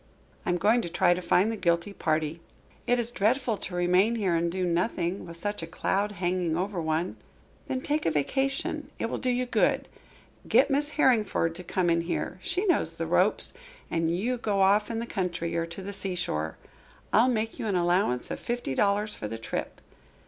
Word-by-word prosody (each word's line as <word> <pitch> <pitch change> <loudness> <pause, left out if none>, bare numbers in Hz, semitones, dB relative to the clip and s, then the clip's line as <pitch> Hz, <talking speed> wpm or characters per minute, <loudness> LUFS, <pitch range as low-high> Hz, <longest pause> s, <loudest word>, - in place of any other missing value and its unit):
"I - - +2
am 175 - +2
going 215 +7 +3
to 175 - -5
try 175 - +3
to 180 - -4
find 190 +4 +3
the - - -2
guilty 170 0 0
party." 155 -2 -1 0.5
"It 245 - +3
is 240 -1 -1
dreadful 240 +2 +1
to 180 - -5
remain 180 +6 +3
here 195 -6 0
and 170 0 +1
do 185 +1 -1
nothing, 175 +1 -1
with 170 0 -8
such 205 +3 -3
a 165 - -5
cloud 200 +4 -1
hanging 175 -3 -1
over 185 0 -2
one." 160 +3 -1 0.5
"Then 260 -1 -2
take 300 - 0
a - - +5
vacation. 270 - 0
It 230 - -2
will - - -2
do 255 - 0
you 250 0 +1
good. 245 - +1 0.6
Get 275 +2 +4
Miss 290 +2 +5
Harringford 215 - +3
to 180 +2 -7
come 180 +1 0
in 170 0 +2
here 170 +2 -3
she 370 - -1
knows 360 - +2
the - - -4
ropes - - +2 0.4
and 165 -1 +1
you 215 +9 0
go 205 -4 0
off 205 +2 +4
in 230 - -2
the 230 - -2
country 175 -6 -2
or 165 0 0
to 170 +3 -8
the 200 +1 -5
seashore. 175 - -2 0.6
I'll 235 +4 +5
make 225 -2 -1
you - - -2
an 200 - 0
allowance 175 -8 +1
of - - -4
fifty 240 - -3
dollars 205 +6 +1
for 105 - -5
the 115 +2 -5
trip. 115 - -5
190 Hz, 200 wpm, -28 LUFS, 170-225 Hz, 0.6 s, a